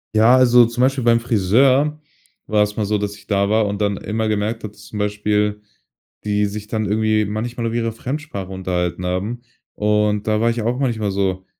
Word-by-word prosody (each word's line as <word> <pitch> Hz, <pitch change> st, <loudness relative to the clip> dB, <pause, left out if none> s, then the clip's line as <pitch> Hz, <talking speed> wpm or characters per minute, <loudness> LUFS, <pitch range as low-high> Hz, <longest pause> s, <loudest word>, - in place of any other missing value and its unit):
Ja, 115 Hz, +4 st, +6 dB
also 125 Hz, -1 st, +6 dB
zum 120 Hz, +2 st, -3 dB
Beispiel 130 Hz, 0 st, +2 dB
beim 115 Hz, 0 st, +4 dB
Friseur 130 Hz, +7 st, +2 dB, 0.5 s
war 105 Hz, -1 st, +3 dB
es 105 Hz, 0 st, -3 dB
mal 105 Hz, -, -1 dB
so, 105 Hz, +1 st, 0 dB
dass 105 Hz, 0 st, -3 dB
ich 105 Hz, 0 st, -18 dB
da 100 Hz, 0 st, +1 dB
war 110 Hz, 0 st, +2 dB
und 100 Hz, 0 st, -3 dB
dann 100 Hz, -1 st, 0 dB
immer 110 Hz, +1 st, -2 dB
gemerkt 110 Hz, +2 st, -1 dB
habe, 105 Hz, -1 st, -6 dB
zum 105 Hz, +1 st, -11 dB
Beispiel 105 Hz, 0 st, 0 dB, 0.6 s
die 105 Hz, 0 st, +1 dB
sich 105 Hz, +1 st, -7 dB
dann 110 Hz, -1 st, -2 dB
irgendwie 110 Hz, +1 st, +1 dB
manchmal 115 Hz, +3 st, -3 dB
auf 115 Hz, -, -3 dB
ihre 115 Hz, -1 st, -1 dB
Fremdsprache 125 Hz, -6 st, -5 dB
unterhalten 90 Hz, -2 st, -2 dB
haben. 100 Hz, +7 st, -3 dB, 0.3 s
Und 105 Hz, 0 st, +1 dB
da 110 Hz, 0 st, +1 dB
war 115 Hz, -, +3 dB
ich 115 Hz, -1 st, -1 dB
auch 120 Hz, +3 st, 0 dB
manchmal 110 Hz, -7 st, -1 dB
so: 95 Hz, -1 st, -1 dB
105 Hz, 195 wpm, -20 LUFS, 105-115 Hz, 0.6 s, Ja